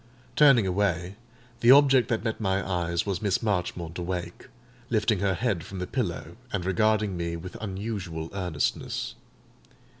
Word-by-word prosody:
Turning 135 Hz, -8 st, +6 dB
away, 95 Hz, -1 st, 0 dB, 0.4 s
the 120 Hz, -, +3 dB
object 135 Hz, -3 st, +7 dB
that 115 Hz, -4 st, -1 dB
met 115 Hz, -1 st, -2 dB
my 95 Hz, -1 st, 0 dB
eyes 85 Hz, -2 st, -1 dB
was 95 Hz, -3 st, -2 dB
Miss 100 Hz, +1 st, 0 dB
Marchmont 90 Hz, -4 st, -2 dB
awake, 90 Hz, 0 st, -5 dB, 0.4 s
lifting 110 Hz, -3 st, +1 dB
her 100 Hz, -1 st, +1 dB
head 100 Hz, -6 st, -1 dB
from 95 Hz, -, -8 dB
the 90 Hz, -, -3 dB
pillow, 85 Hz, -1 st, -3 dB
and 95 Hz, -4 st, -2 dB
regarding 105 Hz, +1 st, +2 dB
me 85 Hz, -1 st, -3 dB
with 85 Hz, +2 st, -8 dB
unusual 95 Hz, -5 st, -4 dB
earnestness. 90 Hz, -6 st, -2 dB
95 Hz, 145 wpm, -27 LUFS, 90-110 Hz, 0.4 s, object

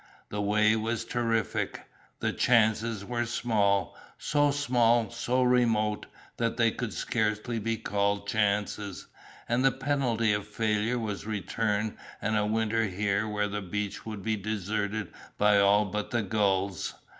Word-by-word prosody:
The 105 Hz, -, -3 dB
way 105 Hz, +1 st, +3 dB
was 115 Hz, +1 st, -2 dB
terrific, 115 Hz, -3 st, -1 dB, 0.4 s
the -, -, 0 dB
chances 110 Hz, -2 st, +2 dB
were 120 Hz, 0 st, -2 dB
small, 105 Hz, -4 st, +1 dB, 0.2 s
so 145 Hz, -1 st, +2 dB
small, 120 Hz, -5 st, +2 dB
so 125 Hz, +2 st, 0 dB
remote, 115 Hz, -4 st, +2 dB, 0.3 s
that -, -, -1 dB
they -, -, +4 dB
could -, -, -4 dB
scarcely 110 Hz, +1 st, -1 dB
be 115 Hz, +1 st, -1 dB
called 100 Hz, -1 st, -1 dB
chances, 105 Hz, -1 st, -1 dB, 0.4 s
and 120 Hz, +2 st, +1 dB
the 135 Hz, -, +6 dB
penalty 130 Hz, -5 st, +1 dB
of 105 Hz, 0 st, -2 dB
failure 110 Hz, +2 st, 0 dB
was 105 Hz, -3 st, -4 dB
return 105 Hz, +1 st, -1 dB, 0.2 s
and 110 Hz, +1 st, -1 dB
a 105 Hz, 0 st, +2 dB
winter 110 Hz, +1 st, +1 dB
here 100 Hz, +2 st, 0 dB
when 105 Hz, -1 st, -1 dB
the 105 Hz, 0 st, -3 dB
beach 105 Hz, +2 st, -4 dB
would 105 Hz, -3 st, -6 dB
be 110 Hz, -1 st, 0 dB
deserted 105 Hz, 0 st, -3 dB, 0.2 s
by 105 Hz, 0 st, +5 dB
all 100 Hz, +1 st, +5 dB
but 105 Hz, +2 st, -3 dB
the 120 Hz, -2 st, 0 dB
gulls. 100 Hz, -1 st, 0 dB
110 Hz, 145 wpm, -28 LUFS, 105-115 Hz, 0.4 s, the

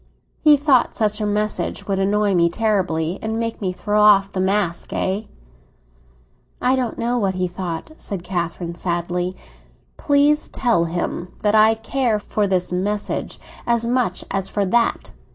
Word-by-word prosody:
"He 300 Hz, -2 st, +7 dB
thought 275 Hz, -4 st, +3 dB
such 210 Hz, -1 st, 0 dB
a 210 Hz, -, 0 dB
message 210 Hz, +1 st, -1 dB
would 195 Hz, -1 st, 0 dB
annoy 205 Hz, +1 st, +2 dB
me 170 Hz, -1 st, +3 dB
terribly, 180 Hz, -4 st, 0 dB
and 220 Hz, 0 st, -2 dB
make 230 Hz, -1 st, -3 dB
me 190 Hz, -2 st, -1 dB
throw 210 Hz, +3 st, 0 dB
off 200 Hz, -2 st, +5 dB
the 190 Hz, -, -3 dB
mask, 190 Hz, -2 st, 0 dB
eh?" 200 Hz, +3 st, -1 dB, 1.3 s
"I 255 Hz, +1 st, +2 dB
don't 250 Hz, -3 st, -2 dB
know 240 Hz, +1 st, 0 dB
what 195 Hz, -3 st, 0 dB
he 185 Hz, 0 st, 0 dB
thought," 175 Hz, -, -5 dB
said 195 Hz, -4 st, -5 dB
Catherine 175 Hz, -1 st, -3 dB
wearily. 175 Hz, +1 st, -2 dB, 0.6 s
"Please 290 Hz, +1 st, +2 dB
tell 230 Hz, -10 st, +1 dB
him 175 Hz, +1 st, -3 dB, 0.2 s
that 210 Hz, 0 st, +3 dB
I 220 Hz, +1 st, +6 dB
care 230 Hz, 0 st, 0 dB
for 210 Hz, 0 st, -1 dB
his 180 Hz, -2 st, -1 dB
message 205 Hz, +3 st, -2 dB, 0.3 s
as 235 Hz, -1 st, +1 dB
much 240 Hz, -6 st, 0 dB
as 195 Hz, -1 st, -1 dB
for 205 Hz, -1 st, 0 dB
that!" 230 Hz, +5 st, +1 dB
205 Hz, 155 wpm, -21 LUFS, 180-225 Hz, 1.3 s, He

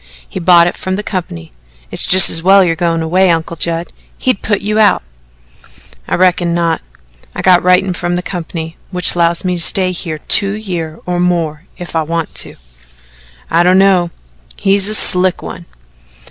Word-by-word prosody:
"He -, -, -7 dB
bought 175 Hz, -1 st, +4 dB
it 175 Hz, -, -2 dB
from 185 Hz, 0 st, -4 dB
the 205 Hz, -, -5 dB
company. 85 Hz, -, -6 dB, 0.4 s
It's -, -, -1 dB
just 185 Hz, 0 st, +7 dB
as 165 Hz, -, +2 dB
well 195 Hz, +2 st, +5 dB
you're 165 Hz, -2 st, 0 dB
goin' 165 Hz, 0 st, -1 dB
away, 185 Hz, +3 st, +1 dB
Uncle 165 Hz, 0 st, -1 dB
Judd. 170 Hz, +1 st, -3 dB, 0.3 s
He'd 255 Hz, -6 st, -2 dB
put 205 Hz, -2 st, -2 dB
you 210 Hz, +2 st, -2 dB
out." 205 Hz, -, +3 dB, 1.0 s
"I -, -, -1 dB
reckon 175 Hz, -1 st, +1 dB
not. 165 Hz, -2 st, -1 dB, 0.5 s
I -, -, -5 dB
got 180 Hz, -1 st, +4 dB
writin' 180 Hz, +1 st, +2 dB
from 175 Hz, 0 st, -3 dB
the 180 Hz, -, -4 dB
company 165 Hz, -2 st, -7 dB
which 180 Hz, -2 st, +1 dB
'lows 170 Hz, +1 st, 0 dB
me 180 Hz, -1 st, -1 dB
to -, -, 0 dB
stay 185 Hz, +2 st, +3 dB
here 170 Hz, -3 st, -5 dB
two 195 Hz, +6 st, +1 dB
year 175 Hz, -7 st, -6 dB
or 180 Hz, 0 st, -3 dB
more 170 Hz, -3 st, -2 dB
if 175 Hz, -1 st, -9 dB
I 160 Hz, -, +1 dB
want 165 Hz, +1 st, -4 dB
to." -, -, -11 dB, 1.0 s
"I 165 Hz, -, +3 dB
don't 180 Hz, +1 st, +3 dB
know. 190 Hz, -3 st, +2 dB, 0.5 s
He's 195 Hz, 0 st, +2 dB
a 215 Hz, -, +4 dB
slick 185 Hz, -2 st, +4 dB
one." 170 Hz, -, -9 dB
175 Hz, 180 wpm, -13 LUFS, 170-185 Hz, 1.0 s, just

